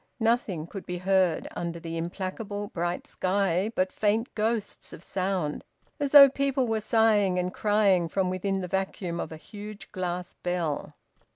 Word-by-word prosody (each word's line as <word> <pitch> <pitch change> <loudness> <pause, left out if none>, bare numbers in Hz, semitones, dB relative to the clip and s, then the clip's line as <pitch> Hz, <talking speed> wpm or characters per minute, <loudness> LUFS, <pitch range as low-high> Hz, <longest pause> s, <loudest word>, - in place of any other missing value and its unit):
Nothing 225 -8 +1
could 195 +3 -9
be 180 - -3
heard, 185 -2 +2
under 170 -1 -4
the 165 0 -6
implacable 195 +4 -4
bright 175 +1 -2
sky, 190 +1 0
but 185 0 +1
faint 215 +3 0
ghosts 220 0 -2
of 170 - -10
sound, 185 -6 -2 0.4
as 285 -1 0
though 280 0 +11
people 275 -1 0
were 220 -1 0
sighing 210 -4 +3
and 180 +1 -1
crying 205 -5 +3
from 185 +2 0
within 195 +1 -1
the 180 - -4
vacuum 185 -2 -2
of - - -4
a 160 - -7
huge 205 +3 -10
glass 180 -1 -3
bell. 175 -5 -2
190 Hz, 160 wpm, -27 LUFS, 175-210 Hz, 0.4 s, though